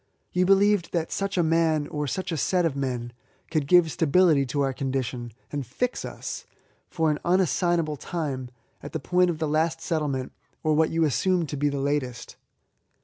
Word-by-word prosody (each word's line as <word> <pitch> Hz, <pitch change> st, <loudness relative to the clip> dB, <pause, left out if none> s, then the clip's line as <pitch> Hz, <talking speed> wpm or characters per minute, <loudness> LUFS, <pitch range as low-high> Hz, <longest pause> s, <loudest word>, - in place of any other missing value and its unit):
You 180 Hz, 0 st, +2 dB
believed 195 Hz, -1 st, +3 dB
that 165 Hz, -2 st, -1 dB
such 195 Hz, -1 st, -2 dB
a 175 Hz, -, +4 dB
man, 160 Hz, -2 st, +2 dB
or 150 Hz, -1 st, -2 dB
such 185 Hz, +6 st, -3 dB
a 165 Hz, -, -1 dB
set 180 Hz, +4 st, +1 dB
of 155 Hz, -4 st, 0 dB
men, 125 Hz, -3 st, -3 dB, 0.4 s
could 155 Hz, -4 st, 0 dB
give 175 Hz, 0 st, +5 dB
stability 160 Hz, -3 st, +3 dB
to 145 Hz, +3 st, -1 dB
our 135 Hz, -1 st, +1 dB
condition, 130 Hz, -3 st, -3 dB, 0.2 s
and 145 Hz, -1 st, -2 dB
fix 240 Hz, -, -2 dB
us, -, -, -6 dB, 0.4 s
for 160 Hz, -2 st, +1 dB
an 150 Hz, -, -2 dB
unassignable 175 Hz, -3 st, +1 dB
time, 140 Hz, -7 st, -4 dB, 0.3 s
at 145 Hz, -, -9 dB
the -, -, -1 dB
point 180 Hz, 0 st, +2 dB
of 170 Hz, -, -2 dB
the 155 Hz, 0 st, -1 dB
last 160 Hz, +2 st, +1 dB
settlement, 150 Hz, -6 st, -2 dB, 0.3 s
or 155 Hz, -, +2 dB
what 160 Hz, +1 st, +3 dB
you 165 Hz, 0 st, +1 dB
assumed 170 Hz, +3 st, +1 dB
to -, -, -3 dB
be 145 Hz, +1 st, +1 dB
the 140 Hz, -1 st, -3 dB
latest. 135 Hz, -4 st, -2 dB
155 Hz, 185 wpm, -26 LUFS, 140-175 Hz, 0.4 s, give